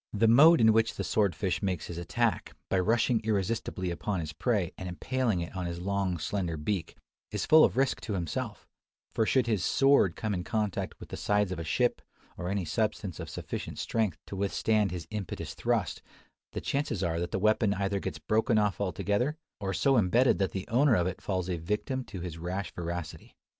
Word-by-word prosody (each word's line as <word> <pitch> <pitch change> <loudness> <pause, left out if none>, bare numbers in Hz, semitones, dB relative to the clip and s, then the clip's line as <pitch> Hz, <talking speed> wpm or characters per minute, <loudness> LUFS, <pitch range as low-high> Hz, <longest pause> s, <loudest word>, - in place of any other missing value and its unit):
The 110 +2 +3
mode 155 +9 +8
in 110 -1 +6
which 115 0 +2
the 100 - -3
sword 100 0 +1
fish 90 -1 -1
makes 95 -6 -1
his 85 -1 -6
attack, 110 +1 -1
by 95 - +2
rushing 115 +4 +2
irresistibly 105 -3 -1
upon 95 +2 -2
his 75 -2 -5
prey, 90 +1 0
and 95 - -6
impaling 115 +1 -1
it 85 +3 -6
on 90 -2 -2
his 85 0 -4
long, 95 -1 -1
slender 85 0 -2
beak, 80 +2 -3 0.3
is - - -2
full 155 0 +7
of - - +2
risk 135 0 +1
to 105 - -4
himself; 85 -5 -4 0.5
for 110 - +1
should 130 -3 +3
his 110 -6 0
"sword" 135 - +4
come 110 -2 -2
in 90 -2 -2
contact 105 -1 -2
with - - -11
the - - -6
sides 105 -2 +1
of 90 - -3
a - - -3
ship, 75 - +1 0.3
or 90 - -4
any 100 -2 -1
substance 105 0 -2
of - - -6
sufficient - - -5
strength 110 -4 -1
to - - -7
withstand 100 +1 +1
his 90 -2 -5
impetuous 105 -4 -5
"thrust," - - -1 0.5
the - - -3
chances 135 - -1
are 85 -1 0
that 85 0 -2
the - - -2
weapon 110 +1 +3
either 100 0 -1
gets - - -4
broken 110 +1 +1
off 105 -2 +1
altogether, 105 - 0 0.2
or 95 -1 -2
so 135 +6 +3
embedded 115 +6 +3
that 95 - +2
the 95 -1 -5
owner 130 +2 +4
of 90 - +2
it 90 -1 -3
falls 95 -3 -2
a 90 -2 -1
victim 105 - -2
to 95 -7 -8
his 85 -2 -6
rash 90 +2 -4
voracity. 85 -2 -6
100 Hz, 205 wpm, -29 LUFS, 90-110 Hz, 0.5 s, mode